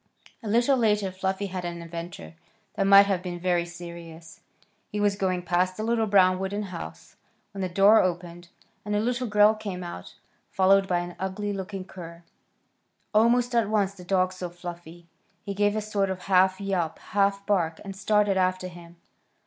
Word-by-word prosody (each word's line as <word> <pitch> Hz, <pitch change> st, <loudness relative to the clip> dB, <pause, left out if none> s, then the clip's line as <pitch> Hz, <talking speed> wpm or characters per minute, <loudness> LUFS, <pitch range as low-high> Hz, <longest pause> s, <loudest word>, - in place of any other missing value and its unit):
A 225 Hz, -, -8 dB
little 240 Hz, +5 st, +3 dB
later 210 Hz, -4 st, +1 dB
Fluffy 190 Hz, +1 st, -2 dB
had 185 Hz, -2 st, -5 dB
an 170 Hz, -1 st, -5 dB
adventure 170 Hz, 0 st, -8 dB, 0.4 s
that 195 Hz, -2 st, 0 dB
might 200 Hz, 0 st, +8 dB
have 195 Hz, -3 st, 0 dB
been 175 Hz, -1 st, -6 dB
very 175 Hz, -1 st, +1 dB
serious. 170 Hz, -1 st, -10 dB, 0.5 s
He 210 Hz, -, -4 dB
was 205 Hz, -1 st, +2 dB
going 185 Hz, -2 st, -1 dB
past 180 Hz, +2 st, 0 dB
a 215 Hz, -, -3 dB
little 225 Hz, -1 st, +1 dB
brown 185 Hz, -2 st, +4 dB
wooden 200 Hz, +2 st, -3 dB
house 80 Hz, -, -9 dB, 0.3 s
when 200 Hz, -1 st, -6 dB
the 185 Hz, -, -1 dB
door 200 Hz, +5 st, +6 dB
opened, 175 Hz, -1 st, -3 dB, 0.4 s
and 210 Hz, 0 st, -2 dB
a -, -, +2 dB
little 245 Hz, +3 st, -1 dB
girl 210 Hz, 0 st, +5 dB
came 200 Hz, -4 st, -6 dB
out, 130 Hz, -, -8 dB, 0.3 s
followed 195 Hz, +1 st, +3 dB
by 175 Hz, -2 st, +1 dB
an 175 Hz, 0 st, -7 dB
ugly 195 Hz, +2 st, -3 dB
looking 190 Hz, -1 st, -6 dB
cur. 170 Hz, -2 st, -11 dB, 0.9 s
Almost 240 Hz, +3 st, +3 dB
at 230 Hz, -3 st, +2 dB
once 200 Hz, -3 st, +1 dB
the 185 Hz, -2 st, -13 dB
dog 185 Hz, 0 st, +1 dB
saw 180 Hz, -1 st, -6 dB
Fluffy. 175 Hz, -1 st, -10 dB, 0.4 s
He 200 Hz, -, -4 dB
gave 205 Hz, +1 st, +1 dB
a 215 Hz, -, -1 dB
sort 205 Hz, -2 st, -1 dB
of 185 Hz, -1 st, -4 dB
half 190 Hz, 0 st, +3 dB
yelp, 185 Hz, -5 st, -2 dB
half 200 Hz, 0 st, 0 dB
bark, 170 Hz, -6 st, 0 dB
and 195 Hz, -1 st, -7 dB
started 210 Hz, 0 st, +2 dB
after 185 Hz, 0 st, 0 dB
him. 170 Hz, -1 st, -13 dB
190 Hz, 180 wpm, -26 LUFS, 175-205 Hz, 0.9 s, might